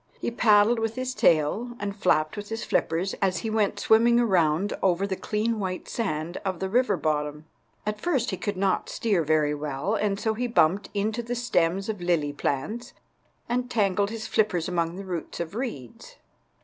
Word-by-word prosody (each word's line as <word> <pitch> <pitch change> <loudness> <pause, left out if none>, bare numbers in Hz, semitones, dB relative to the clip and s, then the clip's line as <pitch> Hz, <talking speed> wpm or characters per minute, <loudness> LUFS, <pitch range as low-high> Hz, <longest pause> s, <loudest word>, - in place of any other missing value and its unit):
He - - -2
paddled 220 0 +4
with 225 0 -2
his 255 0 -3
tail 200 - +2
and 200 -1 -3
flapped 155 -6 +1
with 205 0 -7
his 225 +1 -4
flippers 175 +4 0
as 185 -2 +2
he 220 - -1
went 215 -2 +1
swimming 235 +2 +5
around 185 -4 +2
over 190 0 +2
the 195 -1 -2
clean 215 +3 -1
white 185 -2 -4
sand 170 -6 -3
of 185 -3 -2
the 190 - -2
river 250 +3 +2
bottom. 150 0 -2 0.4
At 210 0 -3
first 270 -10 0
he 190 - -3
could 205 0 -3
not 195 0 0
steer 200 -7 0
very 155 -1 +2
well, 145 +5 -2
and 205 -2 0
so 220 0 0
he 245 +3 -2
bumped 195 -4 +2
into 215 +3 0
the 240 +1 -4
stems 195 -6 +1
of 215 -3 -3
the 175 - -6
lily 155 -5 +1
plants 215 - -3 0.5
and 245 +1 -1
tangled 200 -3 +1
his 220 0 -5
flippers 205 -7 +1
among 170 -2 -1
the 195 +1 -7
roots 175 -3 -5
of 170 -1 -3
the 220 - -5
reeds. 140 - -7
200 Hz, 190 wpm, -26 LUFS, 170-225 Hz, 0.5 s, swimming